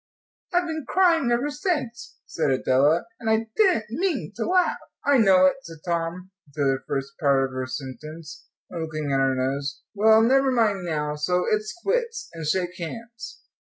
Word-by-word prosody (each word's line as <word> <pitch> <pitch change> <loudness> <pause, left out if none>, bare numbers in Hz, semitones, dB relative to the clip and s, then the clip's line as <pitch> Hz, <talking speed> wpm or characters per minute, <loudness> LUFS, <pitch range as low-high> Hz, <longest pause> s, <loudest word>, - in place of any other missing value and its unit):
"I've 355 -1 +2
been 315 -2 -4
crying 340 -8 +3
ever 250 +5 +1
since," 290 -7 -3
said 160 - -1
Adela, 135 +5 +2
"and 225 - -2
I 220 0 +1
didn't 350 - +2
mean 375 -2 -1
to - - -3
laugh." 365 -1 +2 0.3
"I 280 -2 +4
know 190 -4 +6
it," 185 - +3
said 165 -10 -11
Tom 170 +2 -3 0.2
to - - -9
the 135 -2 +2
first 140 0 -4
part 140 -2 +3
of 135 - -7
her 130 0 -3
sentence, 155 +5 -8 0.2
and 170 - -4
looking 155 -2 -3
at 135 - +2
her 135 0 +2
nose. 140 +2 -2
"Well, 220 +1 +5
never 265 +3 +4
mind 210 -7 +1
now, 150 -3 -2
so 180 +4 0
it's 215 0 -1
quits, 465 +1 -1
and 160 -2 -5
shake 180 +2 -1
hands." 230 +7 -8
185 Hz, 175 wpm, -24 LUFS, -, 0.3 s, know